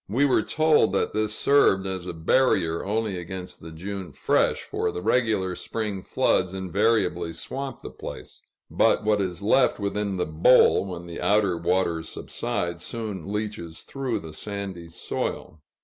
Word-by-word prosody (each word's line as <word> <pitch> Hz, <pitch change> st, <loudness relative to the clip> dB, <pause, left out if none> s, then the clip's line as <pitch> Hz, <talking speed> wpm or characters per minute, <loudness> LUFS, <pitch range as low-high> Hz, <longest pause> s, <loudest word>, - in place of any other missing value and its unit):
We 130 Hz, +8 st, +3 dB
were 130 Hz, -5 st, +3 dB
told 155 Hz, -1 st, +3 dB
that -, -, 0 dB
this 110 Hz, 0 st, 0 dB
served 120 Hz, -9 st, +4 dB
as 95 Hz, -2 st, -3 dB
a -, -, -4 dB
barrier 85 Hz, -1 st, +2 dB
only 105 Hz, -1 st, -1 dB
against 90 Hz, +1 st, -7 dB
the 80 Hz, -, -9 dB
June 95 Hz, +3 st, -6 dB
"fresh," -, -, +1 dB
for -, -, -2 dB
the -, -, -5 dB
regular 105 Hz, -3 st, +1 dB
spring 105 Hz, 0 st, -4 dB
floods 95 Hz, 0 st, +1 dB
invariably 95 Hz, -2 st, +1 dB
swamp 135 Hz, +9 st, -6 dB
the -, -, -7 dB
place; -, -, -9 dB, 0.3 s
but -, -, +3 dB
what 105 Hz, -1 st, +2 dB
is 95 Hz, 0 st, -3 dB
left 125 Hz, +5 st, +3 dB
within 100 Hz, -1 st, -2 dB
the 90 Hz, -, 0 dB
bowl, 85 Hz, +6 st, +5 dB
when 85 Hz, -2 st, -6 dB
the 85 Hz, -1 st, -7 dB
outer 100 Hz, -3 st, +3 dB
waters 85 Hz, -1 st, 0 dB
subside, 85 Hz, 0 st, -3 dB
soon 100 Hz, -3 st, -5 dB
leaches 105 Hz, -6 st, -4 dB
through 135 Hz, -3 st, -3 dB
the 80 Hz, -1 st, -9 dB
sandy 95 Hz, -2 st, -6 dB
soil. 80 Hz, -1 st, -4 dB
95 Hz, 155 wpm, -25 LUFS, 85-110 Hz, 0.3 s, bowl